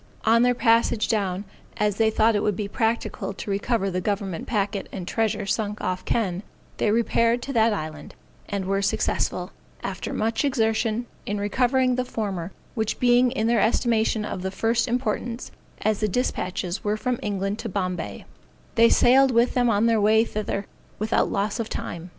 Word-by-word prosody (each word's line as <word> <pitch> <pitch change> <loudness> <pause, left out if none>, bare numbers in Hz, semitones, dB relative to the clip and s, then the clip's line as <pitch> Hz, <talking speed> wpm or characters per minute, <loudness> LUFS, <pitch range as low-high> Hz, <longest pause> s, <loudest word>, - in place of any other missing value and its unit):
On 230 +1 +5
their 245 0 +3
passage 230 -2 +3
down, 195 -3 0 0.3
as 210 -1 +1
they 225 -1 +4
thought 220 +1 +3
it 205 - +1
would 210 - +1
be 205 +1 -3
practicable 225 -2 -1
to 200 - -6
recover 195 0 0
the 185 0 -1
government 195 -3 -2
packet 205 -2 -1
and 180 -3 -6
treasure 215 -1 0
sunk 210 +1 -1
off 185 0 -2
Kenn, 190 -6 0 0.4
they - - +1
repaired 230 +2 +2
to 275 - -4
that 225 -1 +4
island, 155 -6 -5 0.3
and 200 -2 -2
were 195 +1 0
successful, 195 - -1 0.3
after - - -4
much 225 +3 0
exertion, 225 -3 +1 0.2
in 205 0 -1
recovering 255 +5 +2
the 255 - +1
former, 200 -7 -4 0.2
which 220 -3 -2
being 245 0 +4
in 240 -3 -1
their 230 -2 +3
estimation 220 -1 +1
of 190 - -4
the 190 - -2
first 230 +5 0
importance, 240 -1 -2 0.3
as 215 -1 +1
the 215 - +1
dispatches 185 -4 -2
were 210 +1 0
from 250 +1 -1
England 200 0 -2
to 225 - -4
Bombay, 185 -3 -3 0.5
they 230 -1 +6
sailed 265 +2 +5
with 235 0 +3
them 245 -1 +2
on 210 0 +3
their 225 -2 +3
way 220 +2 +4
thither, 210 -2 -3 0.3
without 215 +2 +1
loss 205 +4 -1
of 225 - -3
time. 170 +1 -5
215 Hz, 175 wpm, -24 LUFS, 200-235 Hz, 0.5 s, they